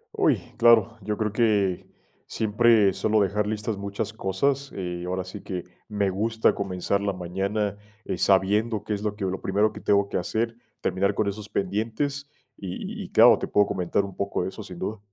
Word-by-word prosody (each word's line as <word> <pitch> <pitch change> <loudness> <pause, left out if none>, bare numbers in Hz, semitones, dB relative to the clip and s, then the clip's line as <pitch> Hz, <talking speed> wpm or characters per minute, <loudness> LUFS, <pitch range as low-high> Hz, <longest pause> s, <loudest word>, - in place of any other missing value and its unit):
¡Uy! - - +3 0.2
Claro. 115 -2 +5
Yo 105 +1 -3
creo 105 -2 -1
que 105 -5 +1 0.4
siempre 110 -2 +3
suelo 110 +3 +1
dejar 105 +1 +1
listas 105 0 -2
muchas 100 +2 -4
cosas, 135 +8 -1
eh, 90 -2 -4
ahora 95 +1 -2
sí 95 +2 -9
que, 90 -3 -5 0.2
me 105 -2 0
gusta 110 +4 +1
comenzar 100 0 -1
la 100 -1 -1
mañana, 100 +3 -2 0.3
eh, - - -3
sabiendo 105 +3 +2
qué 105 - -3
es 100 - -3
lo 105 -1 -1
que 105 -2 -3
lo 95 0 -3
primero 105 +3 +1
que - - -8
tengo 100 -1 +2
que - - -1
hacer, 115 +5 -1 0.3
terminar 100 +2 0
con 110 - 0
esos 105 +1 -5
pendientes 115 +9 -2 0.3
y 95 -2 -6
y - - -9
claro, - - +7
te - - -3
puedo 105 - +3
comentar 95 +1 0
un 100 -2 -9
poco 100 -2 -2
de 90 - -2
eso, 110 - -9
sin 95 -4 -9
duda. 105 +3 -4
100 Hz, 190 wpm, -25 LUFS, 95-110 Hz, 0.4 s, claro